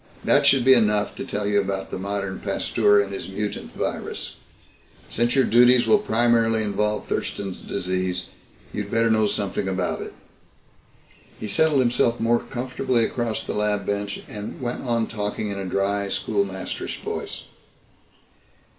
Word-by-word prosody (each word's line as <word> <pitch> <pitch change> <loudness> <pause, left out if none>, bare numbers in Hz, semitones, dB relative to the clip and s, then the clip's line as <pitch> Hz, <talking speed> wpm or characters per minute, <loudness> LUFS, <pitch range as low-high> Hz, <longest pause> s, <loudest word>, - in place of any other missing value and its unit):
That - - +4
should 135 -3 +4
be 130 - +8
enough 105 -4 +3
to - - -4
tell 105 0 -3
you 100 0 +3
about 95 0 -4
the - - -4
modern 100 -1 -3
Pasteur 105 0 +2
and 100 -1 -1
his 95 - -5
mutant 105 +2 -4
virus. - - -4 0.8
Since 120 +2 +1
your 135 - +5
duties 120 +1 +5
will 215 - +5
primarily 115 - +2
involve 105 +1 -1
Thurston's 95 -2 -3
Disease, 90 -1 -2 0.5
you'd 105 -1 -4
better 115 +1 +2
know 110 -1 +3
something 100 -1 -1
about 95 -1 -1
it." - - -8 1.2
He 110 - -5
settled 145 +6 +3
himself 120 -1 +2
more 115 +1 +3
comfortably 125 -1 -1
across 115 -2 -2
the - - -4
lab 105 -1 0
bench 100 0 -3
and 105 -1 -7
went 120 -1 -3
on 115 -3 0
talking 105 -1 -3
in 100 - -4
a 95 - -4
dry 100 +2 0
schoolmasterish 100 -1 -2
voice. - - -5
105 Hz, 150 wpm, -24 LUFS, 100-120 Hz, 1.2 s, be